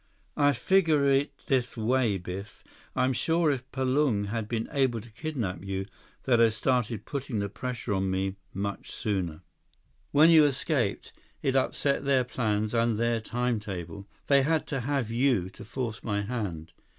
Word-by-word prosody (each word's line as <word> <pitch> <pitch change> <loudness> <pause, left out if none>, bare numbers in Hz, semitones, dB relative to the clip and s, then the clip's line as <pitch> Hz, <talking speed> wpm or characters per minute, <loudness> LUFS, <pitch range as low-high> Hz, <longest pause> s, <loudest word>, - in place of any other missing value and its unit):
"I 145 -1 +4
figure 155 +2 +3
it 140 +1 +1
this 125 -2 0
way, 115 -2 +2
Biff. 95 +3 -7 0.3
I'm 130 0 +2
sure 160 +5 +2
if 130 -1 -4
Palung 130 -6 +1
had 110 -1 -2
been 115 0 -2
able 130 -5 +1
to 115 +2 -13
kidnap 115 - -4
you, 95 0 -3 0.4
they'd 120 -3 +3
have 115 -2 +4
started 115 -2 0
putting 135 -4 -4
the 100 0 -1
pressure 125 -1 -4
on 95 0 0
me 95 +1 -1 0.2
much 100 +1 -4
sooner. 90 -6 -2 0.7
When 155 +3 +6
you 155 -2 +8
escaped, 135 -5 -1 0.3
it 135 -1 +1
upset 140 +1 +1
their 135 -2 +3
plans 110 -3 -1
and 115 -1 +2
their 115 0 +1
timetable. 105 -6 -3 0.2
They 140 -1 +5
had 155 +3 +1
to 135 - -1
have 130 -3 -1
you 115 -7 +2
to - - -11
force 115 0 -4
my 105 -2 -1
hand." 95 -8 -4
120 Hz, 160 wpm, -28 LUFS, 105-135 Hz, 0.7 s, you